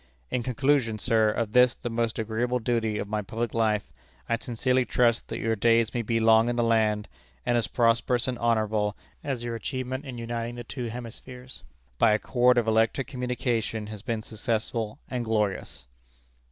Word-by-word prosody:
In 125 - 0
conclusion, 125 -1 +1
sir, 110 -1 +2
of 105 0 -1
this, 125 +1 +5
the - - -6
most 115 -1 -1
agreeable 115 +3 -1
duty 115 -2 0
of 105 - -3
my 105 +1 -1
public 115 +3 -3
life, 110 -2 0 0.3
I 115 - +2
sincerely 125 +2 +1
trust 120 -1 +2
that - - -4
your 115 0 0
days 115 +1 +3
may 120 - 0
be 115 +1 0
long 110 +1 +5
in 120 - -1
the 120 - +1
land, 110 -2 +2 0.4
and 120 -1 +2
as 120 - +1
prosperous 120 +1 +2
and 125 -2 -2
honorable 110 -3 +1 0.3
as 130 -4 -3
your 120 -1 -3
achievement 130 +4 -4
in 130 -3 -7
uniting 115 0 -4
the 120 - -6
two 120 +1 -5
hemispheres 125 +2 -8 0.4
by 105 - +5
a - - +4
cord 125 +1 +3
of 120 -2 +2
electric 110 +4 +2
communication 125 -4 -2
has 105 - -8
been 115 -2 -3
successful 110 0 -3
and 125 -2 -3
glorious." 105 - -2
115 Hz, 180 wpm, -27 LUFS, 110-125 Hz, 0.4 s, this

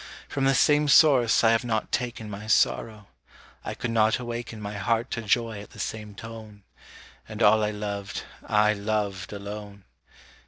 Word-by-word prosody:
From 135 -1 -2
the 135 0 +3
same 150 +2 +4
source 135 -6 +5
I 115 - +6
have 115 +1 +2
not 110 -3 -2
taken 120 -2 -3
My 105 +1 -8
sorrow; 110 -1 +1 0.6
I - - -5
could 120 - -3
not 110 -1 +3
awaken 120 -2 -6
My 105 0 -6
heart 115 +4 -1
to 115 - -2
joy 115 -1 0
at 100 - -12
the - - -13
same 105 +2 -5
tone; 110 -2 -10 0.7
And 110 +1 -3
all 110 +1 +5
I 105 - +1
loved 105 -1 -5 0.2
I 105 0 +3
loved 100 -2 -2
alone. 100 0 -8
110 Hz, 165 wpm, -26 LUFS, 105-115 Hz, 0.7 s, I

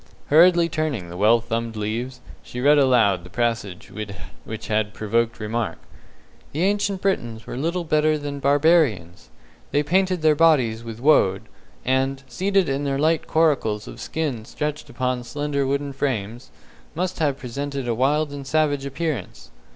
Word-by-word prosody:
Hurriedly 170 +2 +6
turning 155 - -2
the 85 - -8
well 110 +5 +4
thumbed 115 0 -3
leaves, 115 +4 -4 0.2
she 125 - -8
read 145 +3 +5
aloud 120 -9 +3
the 90 - -12
passage 115 -4 -2 0.6
which 110 0 -6
had 105 -1 0
provoked 115 +2 0
remark: 110 -4 -2 0.8
"'The 155 +5 0
Ancient 200 -1 0
Britons 120 - -1
were - - -6
little 170 +7 -1
better 155 -1 +2
than 145 -1 -5
Barbarians. 140 - +2 0.4
They 145 - +1
painted 185 +2 +1
their 155 -1 +6
bodies 140 -8 +3
with 115 -1 -8
Woad, 110 -9 +3 0.4
and, 135 +1 0
seated 190 +8 +1
in 135 +1 -1
their 140 -1 -1
light 155 +2 +1
coracles 135 -10 +1
of - - -9
skin 145 -8 -3
stretched 150 +4 -4
upon 125 -1 -2
slender 145 +1 -2
wooden 140 +1 -1
frames, 120 -4 -3 0.5
must 185 +2 -2
have 145 -4 +1
presented 140 +1 -5
a 120 - +1
wild 145 +5 +1
and 140 -1 -7
savage 145 -2 +1
appearance.'" 135 - -4
135 Hz, 150 wpm, -23 LUFS, 115-155 Hz, 0.8 s, Hurriedly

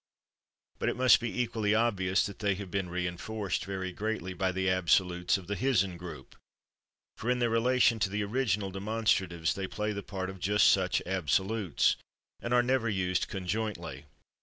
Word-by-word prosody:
But - - +1
it - - -2
must 130 -1 +6
be 120 +1 -4
equally 110 -3 +1
obvious 100 -5 +2
that 100 - -7
they 100 -2 +1
have 95 -2 -7
been 95 -1 -2
reinforced 90 +3 -3
very 95 -1 -4
greatly 100 -2 -3
by 95 +1 0
the 95 +1 -1
absolutes 90 0 +2
of 95 - -10
the 100 +3 -3
/hisn/ 100 -5 +1
group, 85 -6 -10 0.8
for 115 - -3
in 125 - +2
their 120 -2 +1
relation 120 0 +3
to 105 - +1
the 105 +2 -1
original 105 -3 0
demonstratives 95 -5 0
they 95 -1 -4
play 105 +2 -2
the 100 - -4
part 95 -1 -5
of 95 - -12
just 105 +4 +4
such 95 -1 +1
absolutes 95 +2 +1 0.4
and 120 - -5
are 125 0 +4
never 125 -2 +1
used 95 -3 0
conjointly. 90 -7 -4
100 Hz, 170 wpm, -30 LUFS, 90-110 Hz, 0.8 s, must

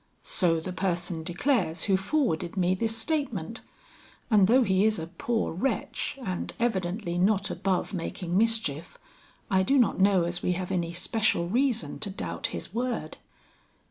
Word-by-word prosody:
"So 170 -4 +1
the 180 +3 -5
person 175 -3 -1
declares 175 - 0
who 195 - +3
forwarded 190 - 0
me 180 0 +3
this 225 +3 -1
statement; 295 +4 -2 0.7
and 205 -3 +6
though 250 +4 +5
he 190 -2 +2
is 220 0 +3
a 160 - -4
poor 220 +7 -2
wretch 270 - -2
and 185 -3 -3
evidently 190 -5 -1
not 195 +1 +2
above 190 +2 -1
making 175 0 -3
mischief, 220 - +1 0.5
I 190 -1 +4
do 270 +9 +2
not 240 -7 +3
know 190 -2 +4
as 175 +1 -2
we 180 - +1
have 185 +1 -4
any 170 -3 -1
special 175 -1 +1
reason 245 +1 0
to 210 - -3
doubt 190 - -3
his - - -6
word." 245 +1 -2
190 Hz, 155 wpm, -27 LUFS, 175-225 Hz, 0.7 s, and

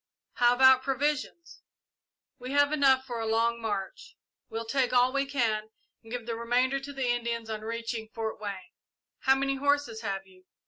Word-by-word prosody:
"How 240 0 +4
about 260 0 +7
provisions?" 290 +5 -2 0.8
"We 250 +2 -6
have 285 0 +4
enough 265 -3 +4
for 240 -3 -5
a 225 - -2
long 230 +1 +1
march. 205 -4 -5 0.3
We'll 225 +1 -4
take 260 +2 0
all 250 +1 +4
we 275 0 0
can, 220 -6 0 0.3
and 225 - -15
give 245 -2 -4
the 230 -1 -3
remainder 250 +4 +1
to 280 +1 -8
the 265 -3 -2
Indians 235 -2 -2
on 215 -1 -4
reaching 230 0 -4
Fort 220 -1 -4
Wayne." 200 -3 -6 0.5
"How 265 0 +4
many 275 0 -1
horses 285 -5 0
have 195 -3 -3
you?" 185 -1 -21
240 Hz, 175 wpm, -28 LUFS, 225-270 Hz, 0.8 s, about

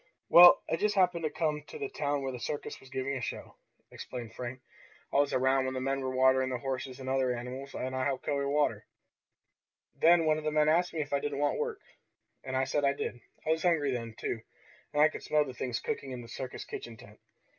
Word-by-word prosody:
"Well, 175 0 +9
I 165 - 0
just 210 +3 +1
happened 180 -3 +2
to - - +1
come 150 -1 -1
to - - -8
the 425 -2 -3
town 145 - -2
where 135 - -2
the 125 - -7
circus 145 +4 -4
was 135 - -16
giving 135 +1 -2
a 130 - -4
show," - - -5 0.4
explained 120 -3 -7
Frank. 125 +1 -6 0.5
"I - - +3
was 145 0 +3
around 130 +1 +2
when 130 0 -2
the - - -1
men 135 +1 -1
were 130 - -2
watering 130 0 +4
the 130 - -2
horses 130 0 -4
and 130 - -7
other 130 -1 +1
animals, 125 +3 -6
and 130 +1 -3
I 130 0 0
helped 135 -2 -2
carry 140 -1 0
water. 145 +1 0 1.1
Then 165 0 +5
one 155 0 +3
of - - -9
the 155 - +1
men 150 0 +3
asked 175 +3 +3
me 160 - -2
if 145 -1 -5
I 140 - +3
didn't 145 0 -3
want 145 - +1
work, 460 -3 -3 0.6
and 130 0 -2
I 130 - +2
said 145 +2 0
I 140 0 +3
did. 120 -3 -4 0.3
I 155 - +2
was 160 0 +1
hungry 160 -5 +2
then, 115 -3 -4
too, 115 - -3 0.5
and 150 0 +4
I - - +8
could 155 - -7
smell 150 -1 +2
the 130 - -7
things 125 -1 -3
cooking 215 -12 -4
in 125 -2 -6
the - - -11
circus 130 +2 -6
kitchen 115 -1 -7
tent. 105 0 -15
140 Hz, 240 wpm, -30 LUFS, 130-155 Hz, 1.1 s, Well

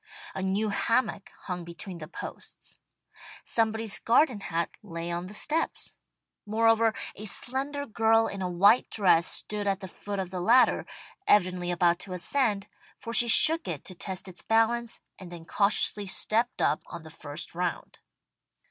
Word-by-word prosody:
A - - -4
new 195 +3 0
hammock 230 0 0
hung 180 -2 -5
between 170 +1 -8
the 155 - -8
posts. - - -10 0.6
Somebody's 220 -1 0
garden 245 -1 +2
hat 170 -3 -3
lay 170 +1 -6
on 175 +1 -4
the 200 - -10
steps. 315 +8 -1 0.5
Moreover, 225 +1 +2 0.2
a 215 - -9
slender 275 +6 -2
girl 225 -1 +2
in 200 -3 -5
a 180 - -2
white 200 +7 +4
dress 180 -5 +3
stood 210 -1 -1
at 195 -1 0
the 190 - -7
foot 200 +3 -6
of 190 -2 -4
the 180 -1 -4
ladder, 240 +7 +4 0.4
evidently 180 -3 +2
about 175 -1 +2
to 185 - -6
ascend, 205 +1 0 0.3
for 230 - -7
she 235 +1 +5
shook 320 +8 +7
it - - -5
to 185 - -5
test 185 +1 -5
its 185 -1 -7
balance, 225 +1 0 0.2
and 185 -2 -11
then 170 -2 -10
cautiously 200 +1 +1
stepped 230 +5 0
up 150 - +1
on 165 - -9
the 160 - -12
first 150 -1 -6
round. 175 0 -4
200 Hz, 160 wpm, -27 LUFS, 180-225 Hz, 0.6 s, shook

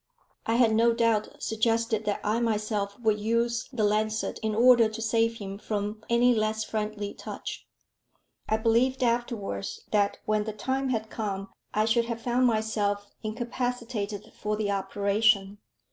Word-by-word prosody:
I 225 - +2
had 235 -2 +4
no 230 +1 +4
doubt 230 -2 +2
suggested 225 0 +1
that 205 -1 -1
I 215 +3 +1
myself 210 -3 -1
would 215 -2 +2
use 235 +2 0
the 240 -5 -1
lancet 215 +1 0
in 220 -1 -1
order 235 -1 +6
to 220 +1 -7
save 225 +1 +1
him 200 -1 -6
from 210 0 -3
any 240 +1 +5
less 215 -1 0
friendly 210 -1 -3
touch. - - -7 0.8
I 220 - +3
believed 245 +4 +2
afterwards, 225 - -2
that 205 -1 +2
when 215 -1 +1
the 215 - -4
time 265 +5 -1
had 220 -3 -2
come 200 -3 -3 0.2
I 215 0 +2
should 230 +1 +2
have 230 -1 -4
found 250 +2 +2
myself 210 -3 0
incapacitated 235 -2 -3
for 210 0 -2
the 210 -1 -1
operation. 200 +1 +1
220 Hz, 150 wpm, -27 LUFS, 210-235 Hz, 0.8 s, order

